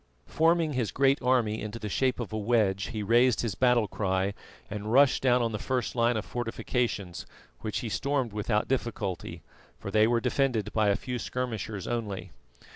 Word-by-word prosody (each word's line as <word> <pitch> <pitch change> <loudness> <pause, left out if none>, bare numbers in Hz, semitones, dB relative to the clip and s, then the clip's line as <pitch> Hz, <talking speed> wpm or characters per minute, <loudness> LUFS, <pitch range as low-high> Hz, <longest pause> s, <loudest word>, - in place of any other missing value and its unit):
Forming 165 -1 +2
his 125 -4 0
great 135 +1 +2
army 120 -4 +1
into 105 +2 -5
the 110 - -5
shape 130 +5 0
of 115 -3 -5
a - - -1
wedge 105 -3 +1
he 110 -3 -4
raised 120 +3 +4
his 115 -5 -2
battle 125 0 +3
cry 95 0 -1 0.3
and 105 0 -5
rushed 135 +2 +5
down 125 -2 +3
on 115 - 0
the 105 - -3
first 130 +1 -2
line 120 -1 +2
of 105 - -3
fortifications, 115 -5 -3 0.3
which 110 -2 -3
he 120 - -4
stormed 135 -1 -1
without 105 0 0
difficulty, 115 -8 -3 0.3
for 100 - -7
they 110 +1 +4
were 120 0 +2
defended 120 -3 0
by 110 -1 +2
a 100 - +3
few 125 +2 -4
skirmishers 110 -6 -4
only. 110 -5 -4
115 Hz, 180 wpm, -28 LUFS, 105-125 Hz, 0.3 s, rushed